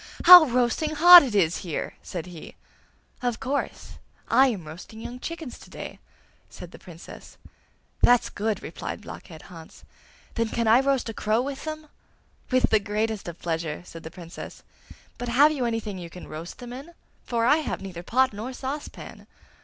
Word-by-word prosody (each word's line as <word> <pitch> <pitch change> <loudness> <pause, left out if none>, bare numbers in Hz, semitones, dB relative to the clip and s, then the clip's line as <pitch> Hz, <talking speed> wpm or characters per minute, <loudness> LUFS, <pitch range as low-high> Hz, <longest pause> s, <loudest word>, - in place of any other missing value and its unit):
How 355 -2 +11
roasting 255 +4 0
hot 350 +3 +10
it 250 -7 -3
is 175 -4 +2
here!' 165 -5 -5
said 175 -3 -6
he. 175 -3 -11 0.7
'Of 245 -2 -2
course! 275 +2 -4 0.3
I 270 +1 +5
am 205 -10 -3
roasting 175 +8 -11
young 245 +2 -8
chickens 325 -3 -7
to - - -15
day!' - - -9 0.5
said 175 -1 -11
the - - -13
Princess. 170 -2 -13 0.6
'That's 245 -1 +4
good!' 215 0 -3
replied - - -7
Blockhead 160 -5 -11
Hans; 165 -2 -14 0.5
'then 230 -1 -1
can 230 0 -1
I 225 +3 +6
roast 270 -2 0
a - - -5
crow 220 +3 0
with 275 +2 -6
them?' 310 0 -6 0.6
'With 255 -1 +2
the 220 - +5
greatest 215 0 -3
of 170 -1 -7
pleasure!' 165 -2 -4
said 165 - -11
the 160 - -8
Princess; 170 0 -10 0.6
'but 245 - -4
have 285 +6 +5
you 270 -5 -2
anything 220 -4 -3
you 170 -1 -8
can 180 +2 -11
roast 165 +3 -8
them 245 0 -9
in? 285 +7 -10 0.3
for 230 -1 -1
I 295 +5 +5
have 315 - -3
neither 180 -3 -7
pot 255 +6 +1
nor 225 +6 -6
saucepan. 275 +3 -7
230 Hz, 175 wpm, -25 LUFS, 180-265 Hz, 0.7 s, How